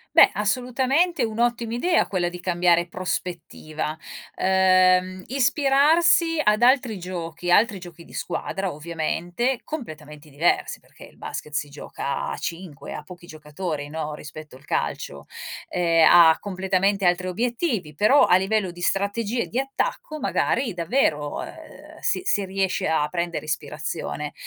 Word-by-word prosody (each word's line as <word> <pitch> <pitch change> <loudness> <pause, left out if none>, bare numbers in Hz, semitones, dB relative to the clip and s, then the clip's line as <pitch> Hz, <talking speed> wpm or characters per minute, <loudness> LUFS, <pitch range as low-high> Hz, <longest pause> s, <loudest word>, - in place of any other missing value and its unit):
Beh, - - +9
assolutamente 260 - +1
è - - +3
un'ottima 235 +1 -1
idea 335 +8 +2
quella 175 -3 -1
di 180 0 -9
cambiare 175 -1 +2
prospettiva, 165 -4 -4 0.4
ehm, 185 0 +3
ispirarsi 295 +5 +3
ad 210 +1 +3
altri 245 -5 +3
giochi 175 -1 -5
altri 205 +1 +4
giochi 170 -2 -12
di - - -17
squadra, 190 +1 -3
ovviamente, 170 - -2
completamente 155 - -8
diversi 150 +5 0
perché - - -16
il - - -19
basket 150 - -7
si 145 0 -1
gioca 140 -1 -5
a - - -4
5, 165 -5 -6
ha - - -6
pochi 175 +3 -13
giocatori, 155 -1 -6
no, 155 0 -4
rispetto 150 -1 -10
al 130 - -17
calcio. 70 -1 -3 0.4
Ehm, 165 -2 +3
ha 165 -2 +7
completamente 195 0 0
altri 180 +1 +1
obiettivi, 230 - -2
però, 215 - +5
a 180 - +5
livello 195 0 0
di 175 0 -10
strategie 205 +5 -1
di 240 - -5
attacco, 270 - -2
magari, 255 -6 0
davvero, 165 - 0
ehm, - - -12
si - - 0
si 205 - +1
riesce 190 0 -1
a 150 -2 +1
prendere 170 -1 -3
ispirazione, 155 - -4
185 Hz, 135 wpm, -24 LUFS, 165-235 Hz, 0.4 s, Beh